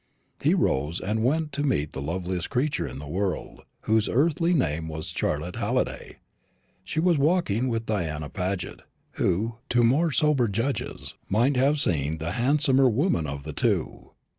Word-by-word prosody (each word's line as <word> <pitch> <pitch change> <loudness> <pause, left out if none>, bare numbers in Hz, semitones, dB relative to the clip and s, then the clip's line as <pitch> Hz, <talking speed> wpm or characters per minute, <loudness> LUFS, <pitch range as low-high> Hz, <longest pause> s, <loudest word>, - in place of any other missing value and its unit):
He - - +3
rose, 75 +6 0
and 110 +3 -1
went 150 +4 +1
to 145 0 -3
meet 75 - 0
the 70 - -5
loveliest 90 +3 -3
creature 140 +3 0
in 65 - -7
the 75 +2 -8
world, 95 +5 -3 0.2
whose 110 -1 +2
earthly 165 +6 +2
name 80 - 0
was 80 0 -5
Charlotte 75 +4 -2
Halliday. - - -2 0.7
She 150 +11 -3
was 170 -2 +3
walking 140 - +2
with 115 -2 -2
Diana 80 -9 -2
Paget, 90 +1 -4 0.4
who, 110 +6 0
to 120 -1 +3
more 150 +8 +3
sober 140 -2 +3
judges, 115 +7 -3 0.2
might 120 +8 +3
have 140 +4 +3
seemed 75 - 0
the 80 +2 -3
handsomer 135 +3 +3
woman 120 - +1
of 70 0 -5
the 75 +1 -6
two. - - -1
110 Hz, 160 wpm, -26 LUFS, -, 0.7 s, He